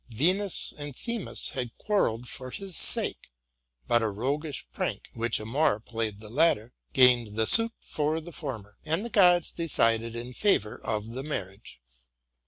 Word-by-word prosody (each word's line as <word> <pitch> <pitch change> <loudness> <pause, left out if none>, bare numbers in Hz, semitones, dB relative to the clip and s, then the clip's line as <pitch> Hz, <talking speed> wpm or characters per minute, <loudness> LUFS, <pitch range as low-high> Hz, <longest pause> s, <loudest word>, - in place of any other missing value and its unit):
Venus 180 - 0
and 145 -2 -6
Themis 235 - -2
had 125 -4 -5
quarrelled 125 - 0
for 130 +1 -5
his 190 +6 -6
sake; - - +1 0.6
but 120 0 +3
a 110 - 0
roguish 140 +8 -3
prank, - - -4
which 115 0 +1
Amor 120 +2 +1
played 110 -2 -4
the 110 +2 -10
tatter, 125 -7 +2 0.2
gained 125 -5 +4
the 110 0 +2
suit 225 - +6
for 155 +1 -1
the 170 +2 -10
former: 105 -9 -7
and 160 +7 -1
the 235 - -6
gods 180 -4 +5
decided 115 -8 +2
in 120 +2 -6
favor 120 - +1
of 110 0 -3
the 130 +3 -5
marriage. 100 - -7
125 Hz, 155 wpm, -28 LUFS, 115-160 Hz, 0.6 s, suit